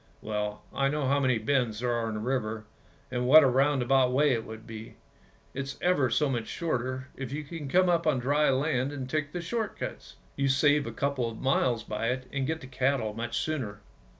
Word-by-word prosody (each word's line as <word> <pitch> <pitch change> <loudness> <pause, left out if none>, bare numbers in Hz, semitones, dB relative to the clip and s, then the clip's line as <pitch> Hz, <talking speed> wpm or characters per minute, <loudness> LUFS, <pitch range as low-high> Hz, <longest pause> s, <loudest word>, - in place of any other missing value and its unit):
Well, 105 -1 -3
I 135 - +1
know 145 0 -1
how 140 +2 +3
many 130 -3 +2
bends 115 -2 0
there 125 -1 0
are 115 -1 0
in 110 - -3
the - - -3
river 110 -3 -2 0.5
and 125 -1 -1
what 155 +4 +9
a - - +5
roundabout 135 -1 +3
way 145 +3 +3
it 115 -2 -2
would 110 0 -9
be. 110 0 -9 0.6
It's 140 0 -5
ever 175 -8 +2
so 150 +6 +2
much 120 -5 -2
shorter 130 -4 -3
if 135 -2 -6
you 150 +2 -3
can 150 0 -7
come 185 +4 +4
up 170 -2 +2
on 150 -4 +3
dry 145 +4 +2
land 135 0 +1
and 135 -3 -5
take 150 +1 -2
the 175 - -4
short 215 +4 -3
cuts, - - -7 0.2
you 140 0 +1
save 145 +2 +3
a - - -4
couple 140 -4 -1
of 115 - -9
miles 130 -3 +1
by 110 +2 -3
it, 130 0 -3
and 135 -1 -1
get 160 0 -2
the - - -9
cattle 130 -3 0
much 115 +2 -3
sooner. 120 -10 -3
130 Hz, 215 wpm, -28 LUFS, 120-145 Hz, 0.6 s, what